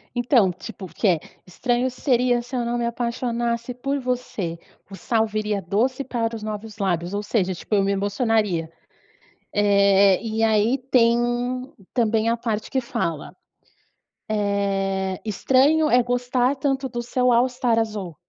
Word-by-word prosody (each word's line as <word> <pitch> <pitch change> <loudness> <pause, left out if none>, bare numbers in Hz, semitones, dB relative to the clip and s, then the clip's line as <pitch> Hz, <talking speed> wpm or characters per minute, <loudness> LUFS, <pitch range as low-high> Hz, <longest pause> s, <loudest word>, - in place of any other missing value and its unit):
Então, 240 -5 +3
tipo, 195 +2 -9
o - - -7
que 210 - 0
é, 170 -3 +3 0.3
estranho 245 +7 0
seria 245 -2 +1
se 250 +2 -10
eu 240 -1 0
não 240 +1 -1
me 240 - -1
apaixonasse 235 0 -2
por 275 +3 -2
você, 245 -10 -3 0.3
o - - -9
sal 225 +1 0
viria 215 -1 -2
doce 245 +9 0
para 230 -2 -2
os 215 - -9
novos 215 0 -6
lábios, 180 -2 -1
ou 205 - -1
seja, 195 -4 0
tipo 210 - -4
eu 200 - +4
me 200 +1 +1
emocionaria. 200 -4 0 0.8
Eh, 200 -1 +4
e 225 0 -2
aí 220 +4 +3
tem 235 -2 +5 0.8
também 225 -2 +1
a 230 - +2
parte 225 -2 -3
que 265 - +1
fala. 165 -10 -3 1.6
Eh, 190 -1 -3
estranho 275 +9 +3
é 245 0 +4
gostar 245 +2 0
tanto 270 -1 -1
do 240 0 -4
seu 250 +1 +1
All 240 +2 +4
Star 245 -2 +1
azul, 205 -7 -3
230 Hz, 155 wpm, -23 LUFS, 205-245 Hz, 1.6 s, tem